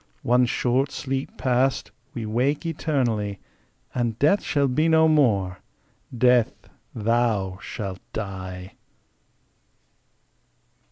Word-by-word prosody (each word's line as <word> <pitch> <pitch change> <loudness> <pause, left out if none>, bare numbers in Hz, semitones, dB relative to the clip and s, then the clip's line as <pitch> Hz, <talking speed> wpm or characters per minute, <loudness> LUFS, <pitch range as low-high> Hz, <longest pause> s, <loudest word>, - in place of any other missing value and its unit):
One 125 +1 +3
short 130 +4 +1
sleep 135 0 -4
past, 125 -3 +1 0.2
we 115 -3 -3
wake 130 +9 0
eternally, 120 -11 -1 0.5
And 120 -3 -1
Death 155 +10 +3
shall 140 -1 +1
be 155 +6 +2
no 160 0 +5
more: 105 -12 +2 0.6
Death, 125 -1 +2 0.3
thou 110 -4 0
shalt 95 -4 -5
die! 95 -3 -6
120 Hz, 95 wpm, -24 LUFS, 105-135 Hz, 0.6 s, no